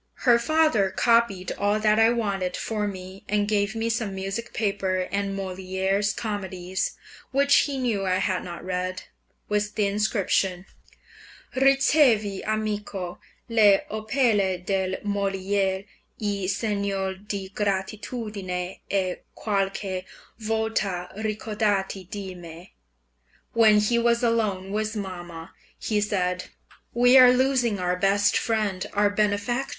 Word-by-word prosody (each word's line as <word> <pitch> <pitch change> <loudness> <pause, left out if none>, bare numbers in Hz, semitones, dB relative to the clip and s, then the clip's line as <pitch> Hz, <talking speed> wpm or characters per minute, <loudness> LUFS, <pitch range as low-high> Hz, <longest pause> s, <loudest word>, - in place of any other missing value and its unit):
Her 240 -2 +6
father 250 -7 +2
copied 230 -3 +2
all 205 +1 +2
that 215 0 +3
I 225 0 +6
wanted 200 -6 -1
for 210 -2 -2
me, 190 0 -8
and 205 0 +1
gave 205 +1 0
me 225 0 -1
some 225 -3 -2
music 195 +5 -4
paper 195 -3 -1
and 200 0 -1
Molière's 190 +1 -1
comedies 190 -4 -3 0.3
(which 280 +1 +3
he 280 -2 -3
knew 235 -6 0
I 185 - +2
had 185 0 0
not 175 -1 -8
read), 185 0 -3 0.4
with 210 0 -1
the 210 - +2
inscription, 200 -3 0 0.9
"Ricevi, 265 -6 +3
amico, 210 -4 -3 0.3
le 215 -4 +5
opere 215 -4 +1
del 190 -1 0
Molière 195 -1 0 0.3
in 200 -3 -2
segno 200 -1 -1
di 195 0 -6
gratitudine 200 -2 -3
e 185 -2 0 0.2
qualche 195 -2 -2 0.3
volta 215 -5 -1
ricordati 210 -3 -1
di 195 -2 -6
me." 175 0 -11 0.8
When 220 -2 +6
he 235 +3 +2
was 235 0 +2
alone 210 -5 0
with 215 +1 -2
mamma, 175 -5 -7 0.3
he 210 -2 -1
said, 185 -3 -1 0.5
"We 245 +2 +6
are 250 -1 +9
losing 250 -4 +2
our 180 -1 0
best 200 +2 +2
friend, 210 -5 0
our 205 0 +3
benefactor. 210 +5 0
205 Hz, 120 wpm, -25 LUFS, 190-220 Hz, 0.9 s, are